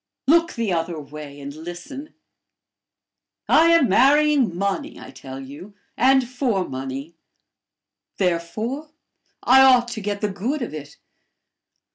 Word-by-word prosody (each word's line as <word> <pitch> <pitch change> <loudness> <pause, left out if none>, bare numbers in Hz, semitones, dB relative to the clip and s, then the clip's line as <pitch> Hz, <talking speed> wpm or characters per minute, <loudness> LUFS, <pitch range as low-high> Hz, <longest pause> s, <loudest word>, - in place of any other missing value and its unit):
Look 330 +4 +3
the 225 -5 -2
other 165 -1 -2
way, 145 0 -10
and 140 0 -8
listen. 175 - -9 1.3
I 330 - +5
am 335 -5 +5
marrying 275 - +3
money, 200 +11 -3
I - - -11
tell 135 0 -10
you 145 +10 -11 0.2
and 265 0 +3
for 245 -7 -1
money; 135 +4 -6 1.0
therefore, 215 - -2 0.5
I 265 +2 +6
ought 250 -2 +5
to 235 -2 -6
get 205 0 -3
the 210 - +1
good 240 +9 -3
of 230 - -6
it. 145 -2 -9
205 Hz, 125 wpm, -22 LUFS, 165-265 Hz, 1.3 s, I